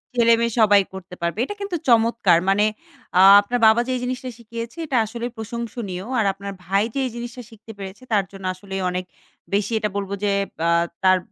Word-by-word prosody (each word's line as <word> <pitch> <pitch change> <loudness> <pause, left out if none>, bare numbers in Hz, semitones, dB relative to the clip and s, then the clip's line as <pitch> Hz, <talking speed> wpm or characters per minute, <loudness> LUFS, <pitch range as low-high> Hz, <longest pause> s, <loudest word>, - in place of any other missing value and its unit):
ছেলেমেয়ে 235 -1 +4
সবাই 205 -2 +6
করতে 185 -1 -9
পারবে। 170 +4 -2
এটা 410 - -6
কিন্তু 400 -3 -3
চমৎকার। 225 -6 +4
মানে 205 +2 +3 0.5
আ - - +8 0.2
আপনার 245 +4 -2
বাবা 225 +2 +5
যে - - -1
এই 250 - -3
জিনিসটা 255 +1 -3
শিখিয়েছে 230 +4 -8
এটা 275 -4 0
আসলে 235 +2 -6
প্রশংসনীয়। 220 -4 -5 0.2
আর 215 - +2
আপনার 200 +1 -7
ভাই 195 +3 +2
যে 275 - -2
এই 255 - -3
জিনিসটা 240 +1 -7
শিখতে 225 0 -13
পেরেছে 195 +4 -9
তার 200 -2 +3
জন্য 195 -1 -10
আসলেই 190 0 -6
অনেক 180 0 -3 0.5
বেশি 205 +3 0
এটা 210 -1 -1
বলবো 200 0 -3
যে 205 - +2 0.4
আ - - +3 0.3
তার 185 0 +6
215 Hz, 190 wpm, -22 LUFS, 195-235 Hz, 0.5 s, আ